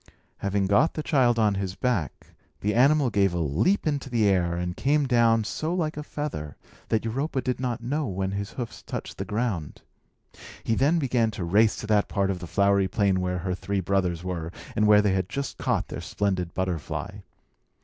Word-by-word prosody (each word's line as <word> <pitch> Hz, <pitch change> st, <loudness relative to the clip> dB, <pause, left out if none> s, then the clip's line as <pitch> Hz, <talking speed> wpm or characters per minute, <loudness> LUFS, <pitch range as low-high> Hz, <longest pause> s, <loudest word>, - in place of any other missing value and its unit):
Having 100 Hz, 0 st, 0 dB
got 120 Hz, +12 st, +3 dB
the 155 Hz, -, -3 dB
child 130 Hz, -7 st, +3 dB
on 105 Hz, -2 st, +3 dB
his 95 Hz, -1 st, -3 dB
back, 120 Hz, -, -2 dB, 0.3 s
the 105 Hz, +1 st, 0 dB
animal 135 Hz, +1 st, +4 dB
gave 100 Hz, -3 st, +2 dB
a -, -, 0 dB
leap 85 Hz, -, +1 dB
into 145 Hz, -3 st, -1 dB
the 115 Hz, -4 st, +2 dB
air, 90 Hz, -3 st, +2 dB
and 90 Hz, 0 st, -3 dB
came 145 Hz, +2 st, +2 dB
down 115 Hz, -3 st, +3 dB
so 155 Hz, +10 st, -2 dB
like 160 Hz, -4 st, -1 dB
a 150 Hz, -, -4 dB
feather 145 Hz, -, -5 dB, 0.3 s
that 110 Hz, 0 st, +1 dB
Europa 135 Hz, +5 st, -1 dB
did 125 Hz, -1 st, -2 dB
not 120 Hz, -3 st, -2 dB
know 145 Hz, +4 st, -1 dB
when 95 Hz, -1 st, -2 dB
his 100 Hz, 0 st, -4 dB
hoofs 120 Hz, -3 st, -6 dB
touched -, -, -6 dB
the -, -, -2 dB
ground. 105 Hz, -8 st, -3 dB, 0.8 s
He 115 Hz, -, 0 dB
then 145 Hz, +8 st, +3 dB
began 125 Hz, -7 st, +1 dB
a 95 Hz, -, -3 dB
race 105 Hz, +6 st, +3 dB
to -, -, -6 dB
that 105 Hz, -1 st, +2 dB
part 100 Hz, -1 st, 0 dB
of 90 Hz, -, -4 dB
the 90 Hz, -, -7 dB
flowery 100 Hz, +1 st, +3 dB
plain 95 Hz, -1 st, +1 dB
where 90 Hz, 0 st, -1 dB
her 90 Hz, +1 st, -2 dB
three 100 Hz, +2 st, -2 dB
brothers 90 Hz, -2 st, 0 dB
were, 85 Hz, -3 st, -4 dB, 0.2 s
and 105 Hz, 0 st, +3 dB
where 105 Hz, 0 st, +6 dB
they 100 Hz, -2 st, +2 dB
had 95 Hz, +1 st, -1 dB
just 140 Hz, +5 st, -4 dB
caught -, -, 0 dB
their -, -, -5 dB
splendid 95 Hz, -4 st, -2 dB
butterfly. 90 Hz, -5 st, -3 dB
105 Hz, 200 wpm, -26 LUFS, 95-125 Hz, 0.8 s, where